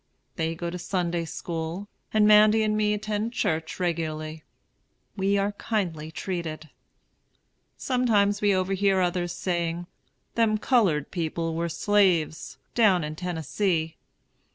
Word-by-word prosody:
They 160 Hz, 0 st, -1 dB
go 170 Hz, +1 st, -4 dB
to 180 Hz, -, -5 dB
Sunday 175 Hz, -2 st, -1 dB
school, 165 Hz, +4 st, -5 dB, 0.2 s
and 215 Hz, -1 st, +4 dB
Mandy 215 Hz, +1 st, +6 dB
and 215 Hz, 0 st, +1 dB
me 210 Hz, 0 st, +2 dB
attend 215 Hz, +2 st, -2 dB
church 160 Hz, -7 st, -1 dB
regularly. 155 Hz, -3 st, -2 dB, 0.7 s
We 200 Hz, 0 st, +1 dB
are 200 Hz, +1 st, +1 dB
kindly 180 Hz, -8 st, -3 dB
treated. 160 Hz, -3 st, -5 dB, 1.1 s
Sometimes 210 Hz, -6 st, +2 dB
we 205 Hz, -1 st, +4 dB
overhear 190 Hz, +1 st, +2 dB
others 175 Hz, -1 st, 0 dB
saying, 175 Hz, -1 st, -2 dB, 0.5 s
"Them 225 Hz, -2 st, +2 dB
colored 195 Hz, -, +2 dB
people 165 Hz, -1 st, -2 dB
were 170 Hz, +1 st, -1 dB
slaves" 175 Hz, -3 st, +1 dB, 0.2 s
down 200 Hz, -7 st, +4 dB
in 150 Hz, 0 st, -4 dB
Tennessee. 165 Hz, 0 st, -1 dB
180 Hz, 120 wpm, -26 LUFS, 165-205 Hz, 1.1 s, Mandy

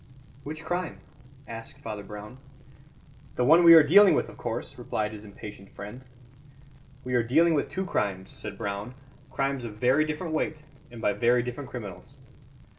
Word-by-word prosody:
"Which 150 Hz, +2 st, -7 dB
crime?" 175 Hz, 0 st, -2 dB, 0.5 s
asked 115 Hz, 0 st, -8 dB
Father 105 Hz, -1 st, -6 dB
Brown. 105 Hz, +5 st, -10 dB, 1.0 s
"The 125 Hz, -, +1 dB
one 165 Hz, +6 st, +7 dB
we 165 Hz, -1 st, +10 dB
are 160 Hz, -, +9 dB
dealing 195 Hz, +7 st, +7 dB
with, -, -, 0 dB
of -, -, -13 dB
course," -, -, -5 dB
replied 105 Hz, 0 st, -2 dB
his 105 Hz, -1 st, -9 dB
impatient 100 Hz, -1 st, -10 dB
friend. 105 Hz, +6 st, -8 dB, 1.0 s
"We 125 Hz, -, -4 dB
are 120 Hz, -, +4 dB
dealing 160 Hz, +9 st, +3 dB
with 145 Hz, -, 0 dB
two 190 Hz, 0 st, -3 dB
crimes," 95 Hz, -, -2 dB
said -, -, -8 dB
Brown, 100 Hz, +5 st, -4 dB, 0.3 s
"crimes 135 Hz, -1 st, -1 dB
of 110 Hz, -3 st, -6 dB
very 125 Hz, +7 st, +3 dB
different 155 Hz, +2 st, -4 dB
weight 155 Hz, -1 st, -2 dB, 0.3 s
and 120 Hz, -2 st, -10 dB
by 105 Hz, -, +2 dB
very 120 Hz, +4 st, +3 dB
different 125 Hz, +3 st, -6 dB
criminals." 105 Hz, -7 st, -8 dB
125 Hz, 165 wpm, -27 LUFS, 105-155 Hz, 1.0 s, we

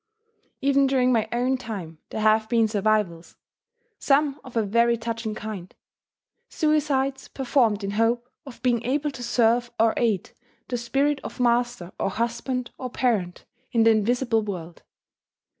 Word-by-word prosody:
Even 275 Hz, 0 st, +3 dB
during 255 Hz, -2 st, +3 dB
my 220 Hz, -2 st, +1 dB
own 250 Hz, +2 st, +1 dB
time 185 Hz, -10 st, -7 dB
there 220 Hz, -, -4 dB
have 220 Hz, 0 st, +3 dB
been 230 Hz, -2 st, +3 dB
survivals, 210 Hz, -5 st, 0 dB, 0.6 s
some 285 Hz, 0 st, +2 dB
of 250 Hz, -3 st, -7 dB
a 225 Hz, -, +3 dB
very 235 Hz, +3 st, +2 dB
touching 230 Hz, -1 st, -4 dB
kind: 205 Hz, -5 st, -7 dB, 0.7 s
suicides 280 Hz, -3 st, 0 dB
performed 240 Hz, -6 st, +1 dB
in 195 Hz, -, -2 dB
hope 230 Hz, +3 st, +1 dB, 0.2 s
of 270 Hz, -2 st, -12 dB
being 240 Hz, -2 st, +2 dB
able 285 Hz, +4 st, 0 dB
to 270 Hz, -3 st, -9 dB
serve 240 Hz, 0 st, +2 dB
or 225 Hz, 0 st, +4 dB
aid 215 Hz, -6 st, 0 dB, 0.4 s
the 245 Hz, -, -1 dB
spirit 275 Hz, +4 st, 0 dB
of -, -, -8 dB
master 240 Hz, -6 st, +1 dB
or -, -, 0 dB
husband 235 Hz, +4 st, -2 dB
or 255 Hz, -, -4 dB
parent 215 Hz, -9 st, -1 dB, 0.3 s
in 230 Hz, -2 st, +4 dB
the 225 Hz, -, +6 dB
invisible 225 Hz, +1 st, +2 dB
world. 175 Hz, -5 st, -6 dB
235 Hz, 145 wpm, -25 LUFS, 215-255 Hz, 0.7 s, the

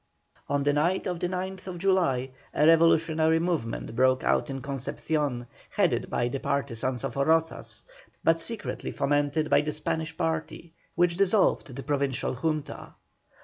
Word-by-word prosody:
On 145 Hz, 0 st, +1 dB
the 145 Hz, 0 st, +2 dB
night 170 Hz, +6 st, +1 dB
of 180 Hz, -3 st, -2 dB
the 175 Hz, -, -1 dB
9th 185 Hz, 0 st, -5 dB
July 170 Hz, -9 st, +1 dB, 0.2 s
a 150 Hz, -, +4 dB
revolutionary 160 Hz, 0 st, +4 dB
movement 165 Hz, -11 st, -2 dB
broke 130 Hz, +1 st, +3 dB
out -, -, +1 dB
in 135 Hz, 0 st, -4 dB
Concepcion, 140 Hz, 0 st, -2 dB, 0.2 s
headed -, -, +1 dB
by 120 Hz, -, 0 dB
the 135 Hz, +3 st, -3 dB
partisans 130 Hz, -2 st, -2 dB
of 135 Hz, -3 st, -3 dB
Rozas, 160 Hz, +4 st, 0 dB, 0.4 s
but 165 Hz, 0 st, +4 dB
secretly 215 Hz, +4 st, -4 dB
fomented 145 Hz, +2 st, 0 dB
by -, -, +6 dB
the 150 Hz, 0 st, -2 dB
Spanish 155 Hz, +1 st, -3 dB
party, 160 Hz, +1 st, -3 dB, 0.2 s
which 175 Hz, 0 st, +2 dB
dissolved 195 Hz, -, +2 dB
the 135 Hz, -, -6 dB
Provincial 140 Hz, -2 st, -1 dB
Junta. 155 Hz, +2 st, -3 dB
155 Hz, 145 wpm, -27 LUFS, 135-165 Hz, 0.4 s, by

